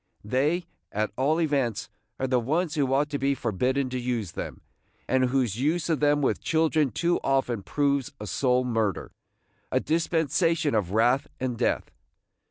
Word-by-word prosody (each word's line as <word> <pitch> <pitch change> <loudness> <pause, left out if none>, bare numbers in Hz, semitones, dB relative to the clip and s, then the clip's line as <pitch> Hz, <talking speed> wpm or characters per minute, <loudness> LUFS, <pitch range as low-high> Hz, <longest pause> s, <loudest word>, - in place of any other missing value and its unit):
They, 150 +10 +1 0.3
at 105 +1 -1
all 145 +6 +1
events, 140 -9 0 0.3
are 130 - 0
the 130 -1 +2
ones 155 +7 0
who 140 -4 0
ought 140 +2 +2
to 145 - -2
be 140 +1 +1
forbidden 130 +4 0
to 130 - -2
use 120 -7 -2
them, - - -6 0.5
and 130 0 +3
whose 125 -5 0
use 160 +4 0
of 160 - +1
them 145 0 +3
with - - +1
children 160 -2 +2
too 170 +9 0
often 135 -5 +1
proves 140 +6 0
a 105 - -6
soul 125 +5 +1
murder, 110 -5 -1 0.3
– - - -42
a - - +3
dispensation 165 0 +1
of 105 -5 +1
wrath 120 +5 +3
and 125 -2 -2
death. - - -1
135 Hz, 170 wpm, -26 LUFS, 120-150 Hz, 0.5 s, and